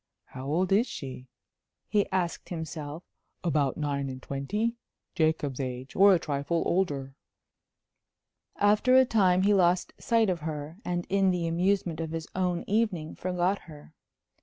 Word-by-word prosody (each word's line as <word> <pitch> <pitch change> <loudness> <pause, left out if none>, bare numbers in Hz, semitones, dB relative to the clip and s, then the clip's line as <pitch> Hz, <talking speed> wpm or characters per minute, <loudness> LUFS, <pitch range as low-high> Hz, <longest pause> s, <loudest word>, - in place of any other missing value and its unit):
"How 130 +1 -8
old 175 +6 0
is 215 +6 +4
she?" 130 - -7 0.6
he 205 -1 +1
asked 180 -3 -2
himself. 160 -1 -6 0.4
"About 150 -6 +1
nine 140 -2 -2
and 130 0 -6
twenty?... 205 - -2 0.4
Jacob's 155 -6 0
age 130 0 -5
or 200 +1 +7
a 185 - +6
trifle 155 +1 -1
older." 145 -7 0 1.4
After 210 +5 +4
a 260 0 +7
time 185 -6 +3
he 205 +1 +4
lost 180 -2 +2
sight 225 -4 +2
of 175 - -2
her, 155 +2 -6
and 175 -1 -2
in 195 -1 +3
the 180 -2 0
amusement 175 -1 0
of 160 -1 -4
his 165 -1 -4
own 180 -2 0
evening 200 -7 0
forgot 185 +2 0
her. 150 0 -13
175 Hz, 145 wpm, -28 LUFS, 150-190 Hz, 1.4 s, or